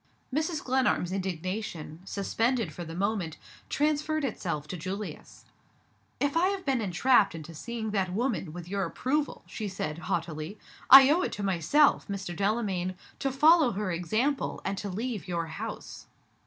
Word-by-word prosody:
Mrs. 315 +2 -1
Glenarm's 255 -8 +1
indignation 185 -3 -4
suspended 225 -1 0
for 175 - -6
the 165 0 -7
moment 195 -4 -1 0.3
transferred 305 0 +1
itself 165 - -3
to - - -3
Julius. 190 +5 -6 0.7
"If 285 +1 0
I 345 +3 +4
have 390 -1 -2
been 265 -4 +1
entrapped 205 +1 +3
into 165 +1 -8
seeing 220 +6 -4
that 190 -3 0
woman, 215 - -1
with 175 +1 -8
your 200 +1 -1
approval," 275 - -1
she 215 - -5
said, 160 -5 -4
haughtily, 165 +2 -3 0.3
"I 270 +1 +11
owe 340 +4 +3
it - - -1
to 205 - -4
myself, 195 - +3
Mr. 195 -3 -4
Delamayn, 195 -3 0 0.2
to 270 - 0
follow 300 -1 +5
her 200 -1 -2
example, 220 - 0
and 195 - -1
to 205 - -4
leave 215 0 -4
your 170 -2 -1
house." - - -7
200 Hz, 155 wpm, -29 LUFS, 175-265 Hz, 0.7 s, I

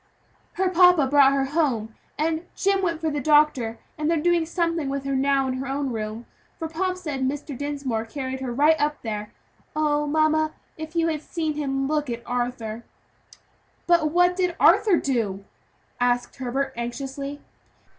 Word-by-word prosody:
"Her 375 +1 0
papa 360 -4 +5
brought 275 0 +5
her 275 -1 +1
home, 265 -7 0 0.2
and 320 +2 -1
Jim 395 0 +1
went 340 -4 -1
for 320 -1 -1
the 290 - -2
doctor, 295 -6 +3 0.2
and 305 +1 0
they're 335 - +2
doing 340 +1 +2
something 335 -4 -1
with 275 0 -3
her 275 0 -1
now 270 0 +2
in 260 - -1
her 270 - -4
own 275 0 -2
room 220 +1 -5 0.3
for 325 - -4
Pomp 365 +3 -2
said 300 -7 -4
Mr. 280 +2 -2
Dinsmore 275 -5 -3
carried 265 +1 -5
her 260 -2 -4
right 295 +6 +4
up 300 0 0
there! 210 -2 -4 0.4
Oh 295 -1 +1
I - - -5
mamma, 310 +1 +2 0.2
if 315 +1 -8
you 335 -1 +2
had 310 -2 -2
seen 315 -1 -3
him 270 -2 -1
look 300 -2 -1
at 235 0 -4
Arthur!" 240 -2 -3 1.0
"But 340 -3 +3
what 355 +2 +3
did 360 -2 0
Arthur 410 -3 +5
do?" 210 -9 -1 0.5
asked 245 0 +1
Herbert 265 +1 -2
anxiously. 270 +4 -5
290 Hz, 170 wpm, -24 LUFS, 260-320 Hz, 1.0 s, papa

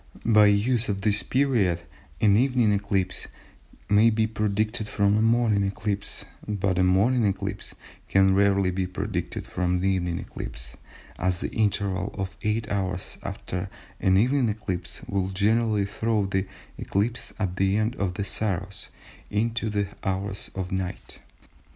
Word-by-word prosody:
By 105 -2 +6
use 110 +3 +2
of 100 -1 -1
this 105 -1 +3
period 115 -9 +1 0.4
an 105 -2 +5
evening 125 -2 +3
eclipse 100 -2 -1 0.6
may 105 +3 +5
be 110 0 +2
predicted 110 +1 -1
from 100 -1 +2
a 110 - +3
morning 115 -2 +3
eclipse 100 +1 -2 0.2
but 100 -3 0
a - - +4
morning 105 +7 +3
eclipse 100 0 -2 0.3
can 95 0 +5
rarely 100 -1 +3
be 90 0 -1
predicted 95 -1 -4
from 90 0 -1
an 90 - -1
evening 90 -3 +1
eclipse - - -7 0.4
(as 90 -1 0
the - - -2
interval 100 -2 0
of 95 -1 -4
eight 110 +1 0
hours 95 -2 -2
after 90 +10 -4 0.3
an 95 0 +3
evening 125 +3 +3
eclipse 95 -4 -4
will 95 -1 -1
generally 105 +2 +2
throw 105 +1 0
the 95 0 -1 0.3
eclipse 115 +4 -1
at 95 -3 -2
the 95 +1 +2
end 110 +3 0
of 90 -2 -1
the 100 - -2
Saros 100 0 -2 0.4
into 115 +2 0
the 100 -1 0 0.2
hours 95 +1 -3
of 95 -1 -4
night). 95 -1 -4
100 Hz, 145 wpm, -26 LUFS, 95-110 Hz, 0.6 s, By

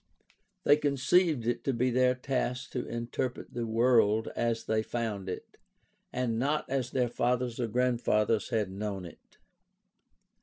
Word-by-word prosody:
They 145 - +6
con 145 -2 0
ceived 155 -2 +3
it 120 0 -1
to 135 - +1
be 125 +2 +1
their 125 +1 +3
task 125 -1 -2
to 125 - -3
interpret 120 +2 -4
the 120 -1 -2
world 110 -1 +3
as 115 -1 0
they 110 0 +1
found 110 -4 -3
it, 90 - -7 0.5
and 120 -3 -1
not 145 +4 0
as 130 -2 -1
their 125 -2 +1
fathers 120 0 -1
or 120 - 0
grandfathers 115 -2 +1
had 110 -5 0
known 100 -1 -4
it. 85 - -15
120 Hz, 150 wpm, -30 LUFS, 110-125 Hz, 0.5 s, They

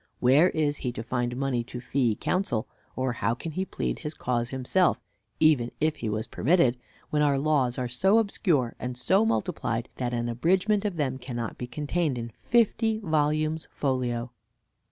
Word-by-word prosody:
Where 140 +8 +5
is 150 -3 0
he 125 - -3
to 115 - -5
find 120 0 -2
money 130 -3 0
to 125 - -7
fee 120 -3 0
counsel, 180 - -1 0.3
or 130 -1 -1
how 115 0 0
can 160 +6 -6
he 185 +5 -2
plead - - -3
his 150 -1 -5
cause 120 -1 -1
himself 135 +8 +2 0.4
(even 150 -7 +4
if 155 0 +1
he 110 - -3
was 110 +1 -2
permitted) 155 -5 +2 0.4
when 150 - +2
our 145 -2 +3
laws 135 -4 +1
are 125 - -1
so 190 - +3
obscure 175 - +1
and 125 0 -4
so 195 - +3
multiplied 130 - -1
that 125 -1 -2
an 120 -1 -1
abridgment 190 - +1
of 200 -4 -1
them 130 -4 -1
cannot 120 -3 -4
be 125 - -4
contained 150 0 -1
in 115 0 -5
fifty 225 -1 +2
volumes 155 -3 0
folio? 125 -3 -1
135 Hz, 175 wpm, -27 LUFS, 120-165 Hz, 0.4 s, Where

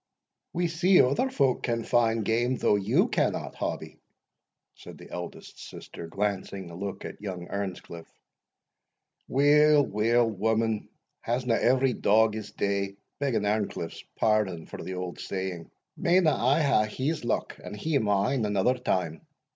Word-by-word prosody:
"We 175 +1 0
see 175 +3 +4
other 140 - +3
folk 140 - +1
can 115 -1 -1
find 115 -2 +2
game, 120 +4 +1
though 105 - +2
you 100 -1 +2
cannot, - - -1
Hobbie," - - -5 0.7
said - - -12
the - - -13
eldest 90 0 -8
sister, 85 - -9
glancing 95 -1 -3
a - - -9
look 100 +2 -5
at - - -8
young 90 -4 -6
Earnscliff. 90 -4 -5 1.2
"Weel, 145 +1 +5
weel, 115 +3 +2
woman, 110 +1 0 0.3
hasna 120 0 0
every 130 +2 +3
dog 110 +1 +3
his 110 -1 -6
day, 100 -1 -1 0.2
begging 135 -7 0
Earnscliff's 105 -5 -2
pardon 105 -7 +1
for - - -8
the 95 - -5
auld 90 -1 -5
saying 95 -3 -4 0.3
Mayna 170 -3 +3
I 135 +6 +2
hae 120 -7 +3 0.2
his 155 -1 -1
luck, 120 - -2
and - - -7
he 150 +5 0
mine, 105 +3 +1
another 105 +5 +1
time? 90 -9 -1
110 Hz, 140 wpm, -27 LUFS, 100-130 Hz, 1.2 s, Weel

